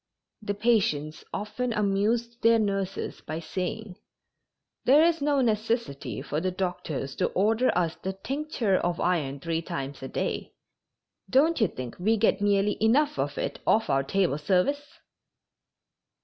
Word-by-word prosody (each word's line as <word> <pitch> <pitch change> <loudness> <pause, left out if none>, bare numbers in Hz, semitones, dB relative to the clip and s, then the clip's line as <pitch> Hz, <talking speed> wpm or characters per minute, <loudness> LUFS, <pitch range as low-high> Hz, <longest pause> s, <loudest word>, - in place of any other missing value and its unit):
The 205 -1 -3
patients 195 -9 +1
often 240 +4 -3
amused 220 +4 0
their 230 0 +5
nurses 195 -3 -2
by 155 +1 -4
saying: 185 +4 -4 0.9
"There 290 +5 +6
is 330 -2 +2
no 285 -1 +2
necessity 215 - -1
for 150 +2 -2
the 185 - 0
doctors 175 -7 -3
to - - +2
order 220 +6 +2
us 170 -2 +1
the 190 - -3
tincture 245 -2 -1
of 175 -1 -1
iron 150 -6 0
three 165 +2 -2
times 140 -3 -5
a 135 - -5
day; - - -3 0.8
don't 300 +3 +3
you 215 - +5
think 125 -6 -7
we 220 +5 +2
get 215 -1 +2
nearly 205 0 +2
enough 290 +7 +3
of - - -2
it - - -3
off 225 +1 +3
our 135 - +3
table 160 +1 0
service?" 195 - 0
200 Hz, 145 wpm, -27 LUFS, 170-230 Hz, 0.9 s, There